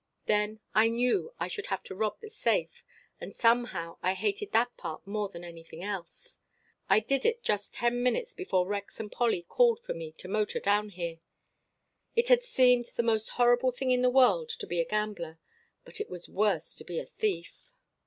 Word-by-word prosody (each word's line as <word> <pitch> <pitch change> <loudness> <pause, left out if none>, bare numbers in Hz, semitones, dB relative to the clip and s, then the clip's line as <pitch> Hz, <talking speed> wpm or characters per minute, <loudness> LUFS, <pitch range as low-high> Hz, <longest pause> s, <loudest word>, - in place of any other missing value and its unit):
Then 210 +1 +1
I 220 +1 +5
knew 250 - +1
I - - -1
should 410 -2 -5
have 190 - -2
to - - -8
rob 210 +2 -2
the 440 - -9
safe, - - 0 0.4
and - - -8
somehow 230 -8 +1
I 185 +1 +1
hated 415 - -1
that 240 +2 +2
part 155 - -7
more 205 0 -2
than 170 -2 -10
anything 165 0 -10
else. 195 -4 -6 0.5
I - - +6
did 265 +5 0
it 470 0 +1
just 205 -1 -1
ten 240 0 +1
minutes 445 - 0
before 190 - 0
Rex 200 +1 -5
and 210 -2 -5
Polly 230 -8 +1
called 470 - +3
for 480 - -5
me 160 -1 -7
to 180 - -9
motor 210 +2 0
down 205 +1 +2
here. 170 -3 -5 1.0
It 470 +1 +2
had - - +7
seemed 250 - +4
the 235 - +1
most 220 -2 +1
horrible 245 +1 +5
thing 255 +1 -1
in 250 0 +3
the 250 - +4
world 265 - +4
to 455 - -5
be 175 - -2
a - - -1
gambler, 205 -6 -3 0.5
but - - -7
it 430 - -5
was 175 - -7
worse 205 0 0
to - - -9
be 175 - -6
a - - -2
thief. 200 - -3
220 Hz, 195 wpm, -30 LUFS, 190-255 Hz, 1.0 s, had